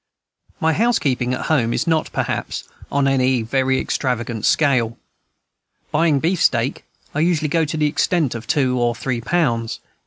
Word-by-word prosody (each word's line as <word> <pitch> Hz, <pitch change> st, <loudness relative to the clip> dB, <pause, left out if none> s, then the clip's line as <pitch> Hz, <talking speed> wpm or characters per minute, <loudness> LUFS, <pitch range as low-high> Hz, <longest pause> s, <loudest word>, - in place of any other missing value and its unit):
My 160 Hz, 0 st, +2 dB
housekeeping 145 Hz, -, +1 dB
at -, -, -5 dB
home 120 Hz, -7 st, +1 dB
is -, -, 0 dB
not, 160 Hz, -2 st, 0 dB
perhaps, -, -, -3 dB, 0.3 s
on 140 Hz, -1 st, +2 dB
any 130 Hz, -3 st, +2 dB
very 130 Hz, +3 st, +1 dB
extravagant 120 Hz, -4 st, -2 dB
scale. 125 Hz, -6 st, +2 dB, 0.9 s
Buying 150 Hz, -2 st, +3 dB
beefsteak, 140 Hz, -7 st, +1 dB, 0.3 s
I 150 Hz, -, -1 dB
usually 160 Hz, -2 st, +1 dB
go 165 Hz, +1 st, +2 dB
to 155 Hz, +1 st, -4 dB
the 155 Hz, -, +2 dB
extent 155 Hz, -1 st, +1 dB
of 115 Hz, 0 st, -7 dB
two 130 Hz, -4 st, +1 dB
or 120 Hz, -1 st, +1 dB
three 120 Hz, 0 st, -3 dB
pounds. 115 Hz, -7 st, 0 dB
135 Hz, 150 wpm, -20 LUFS, 120-155 Hz, 0.9 s, Buying